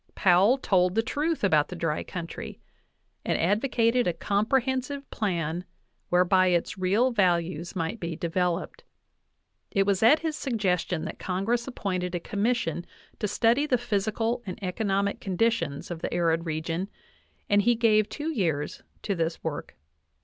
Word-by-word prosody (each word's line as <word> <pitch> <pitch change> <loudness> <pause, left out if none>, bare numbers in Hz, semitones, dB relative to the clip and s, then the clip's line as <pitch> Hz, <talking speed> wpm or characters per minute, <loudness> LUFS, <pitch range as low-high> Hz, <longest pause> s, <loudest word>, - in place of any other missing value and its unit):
\ - - -45
"Powell 195 +7 +5
told 185 -6 +2
the 225 - +3
truth 300 +5 -1
about 155 -7 +4
the 180 - -7
dry 165 -3 -1
country, 170 -2 -7 0.6
and - - 0
advocated 230 +5 +2
a 175 - +1
comprehensive 260 - 0
plan 175 -5 -2 0.5
whereby 185 +1 +4
its 175 -2 +1
real 200 +7 +2
values 175 -4 0
might 165 +5 -2
be 170 -3 -4
devel 175 +1 0
oped. - - -15 0.9
It 195 -3 +2
was 200 -2 +1
at 245 +8 +6
his 320 -2 -2
suggestion 190 - -1
that - - -6
Congress 220 +7 -1
appointed 185 -7 -3
a - - -1
commission 205 -3 -1 0.4
to 210 - 0
study 235 +8 +2
the 255 - +3
physical 225 +2 -1
and 185 - -5
economic 200 +1 0
conditions 185 -7 -1
of 165 -2 -5
the - - -3
arid 165 -1 +1
region, 165 +4 -2 0.6
and 205 0 +4
he 240 +3 +3
gave 215 -2 +3
two 300 +6 -3
years 160 - -1 0.2
to 205 - 0
this 165 -2 -2
work. 150 - -5
195 Hz, 150 wpm, -27 LUFS, 175-230 Hz, 0.9 s, at